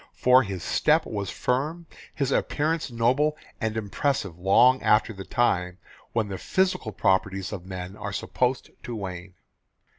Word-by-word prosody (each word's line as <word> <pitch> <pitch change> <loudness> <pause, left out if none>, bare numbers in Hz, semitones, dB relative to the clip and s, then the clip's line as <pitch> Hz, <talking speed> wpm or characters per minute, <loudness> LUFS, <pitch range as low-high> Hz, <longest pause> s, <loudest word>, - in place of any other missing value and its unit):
For 125 +1 +5
his 95 -7 -5
step 155 +1 +2
was 100 -3 -4
firm, 150 +7 -2 0.3
his 140 -2 -1
appearance 155 +3 0
noble 130 +6 +1 0.2
and 110 0 -2
impressive 105 - -1
long 110 +9 +4
after 105 +1 +3
the 95 -1 -8
time 90 -7 0 0.3
when 110 -2 0
the 95 -2 -5
physical 185 -12 0
properties 95 -1 0
of 90 -3 -7
men 90 0 -6
are 100 -1 -5
supposed 125 +6 -1
to 120 - -6
wane. 90 -2 -7
110 Hz, 145 wpm, -26 LUFS, 95-130 Hz, 0.3 s, For